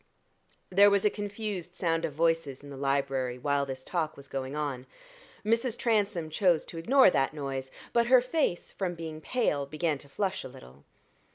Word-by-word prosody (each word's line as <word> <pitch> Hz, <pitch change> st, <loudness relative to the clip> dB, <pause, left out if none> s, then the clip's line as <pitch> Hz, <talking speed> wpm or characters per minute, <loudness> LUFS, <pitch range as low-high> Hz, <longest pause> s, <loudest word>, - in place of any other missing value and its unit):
There 200 Hz, +2 st, +7 dB
was 200 Hz, 0 st, +2 dB
a 210 Hz, -, +4 dB
confused 205 Hz, -4 st, -5 dB
sound 165 Hz, -3 st, 0 dB
of 150 Hz, -, -4 dB
voices 165 Hz, -4 st, 0 dB
in 145 Hz, -, -10 dB
the -, -, -7 dB
library 135 Hz, -2 st, 0 dB
while 140 Hz, +1 st, 0 dB
this 130 Hz, -1 st, -6 dB
talk 160 Hz, -2 st, -2 dB
was 140 Hz, 0 st, -11 dB
going 135 Hz, +1 st, -4 dB
on. 140 Hz, -4 st, -3 dB, 0.6 s
Mrs. 230 Hz, +2 st, +1 dB
Transome 205 Hz, -9 st, 0 dB
chose 175 Hz, -1 st, +2 dB
to 165 Hz, -, -7 dB
ignore 255 Hz, +4 st, +6 dB
that 135 Hz, 0 st, +1 dB
noise, 135 Hz, -2 st, -4 dB, 0.2 s
but 235 Hz, 0 st, +3 dB
her 255 Hz, +1 st, +7 dB
face, 255 Hz, -, -1 dB
from 180 Hz, -3 st, -3 dB
being 160 Hz, -2 st, -7 dB
pale, 150 Hz, -, 0 dB
began 155 Hz, 0 st, -1 dB
to 140 Hz, -, -13 dB
flush 190 Hz, +5 st, -2 dB
a -, -, -6 dB
little. 65 Hz, -, -15 dB
165 Hz, 180 wpm, -29 LUFS, 140-200 Hz, 0.6 s, There